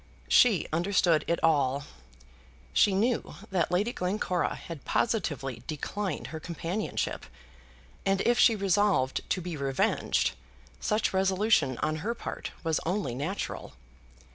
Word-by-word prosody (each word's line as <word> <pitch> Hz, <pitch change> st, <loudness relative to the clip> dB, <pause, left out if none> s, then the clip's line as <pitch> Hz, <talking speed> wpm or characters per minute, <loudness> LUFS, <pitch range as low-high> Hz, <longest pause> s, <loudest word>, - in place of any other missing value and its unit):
She 215 Hz, -10 st, +5 dB
understood 170 Hz, -2 st, +3 dB
it 170 Hz, -, +1 dB
all. 140 Hz, -3 st, +2 dB, 0.9 s
She 195 Hz, -, +4 dB
knew 230 Hz, +5 st, 0 dB, 0.2 s
that 180 Hz, -3 st, +1 dB
Lady 205 Hz, +7 st, +1 dB
Glencora 180 Hz, -1 st, -1 dB
had 165 Hz, -5 st, -9 dB
positively 145 Hz, -, -1 dB
declined 175 Hz, +3 st, -3 dB
her 160 Hz, -, -4 dB
companionship; 175 Hz, +5 st, -3 dB, 0.8 s
and 195 Hz, 0 st, +2 dB
if 240 Hz, 0 st, +2 dB
she 230 Hz, -, +6 dB
resolved 195 Hz, -9 st, +2 dB
to 185 Hz, -, 0 dB
be 175 Hz, -1 st, -5 dB
revenged, 135 Hz, -2 st, +1 dB, 0.5 s
such 215 Hz, -1 st, 0 dB
resolution 190 Hz, -, +2 dB
on 155 Hz, 0 st, 0 dB
her 220 Hz, +9 st, -2 dB
part -, -, -5 dB
was 160 Hz, -2 st, +1 dB
only 180 Hz, -, -1 dB
natural. 150 Hz, +11 st, -4 dB
180 Hz, 120 wpm, -29 LUFS, 155-205 Hz, 0.9 s, she